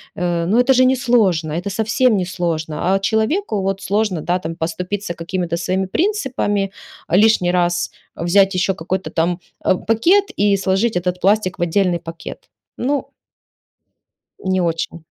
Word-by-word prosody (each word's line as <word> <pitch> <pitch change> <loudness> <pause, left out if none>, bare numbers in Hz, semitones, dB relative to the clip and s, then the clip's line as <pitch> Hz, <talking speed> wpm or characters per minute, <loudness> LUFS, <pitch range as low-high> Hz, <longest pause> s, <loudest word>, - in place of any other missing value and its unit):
Э, 175 -1 -1
но 210 +7 +2
это 255 +2 +4
же 255 +1 +4
несложно, 225 -11 +2
это 175 +5 -3
совсем 220 +4 -2
несложно. 175 -9 0 0.2
А - - +1
человеку 220 - 0
вот 195 0 -1
сложно, 200 -5 0
да, 175 +3 0
там, 165 -1 -5
поступиться 180 +4 -3
какими-то 170 0 -3
своими 185 +2 -1
принципами 260 - 0 0.4
лишний 190 -1 +4
раз, 175 -1 0 0.2
взять 190 +3 +3
еще 185 +1 +1
какой-то 180 +3 -3
там, 170 +1 0 0.3
э, - - +4
пакет 340 - +3
и 200 0 +3
сложить 195 +3 0
этот 180 0 -2
пластик 195 -2 +1
в - - -5
отдельный 175 0 +1
пакет. 165 0 -9 0.3
Ну 275 +3 -1 1.3
Не 185 -1 0
очень. 165 -1 -2
190 Hz, 140 wpm, -19 LUFS, 175-215 Hz, 1.3 s, это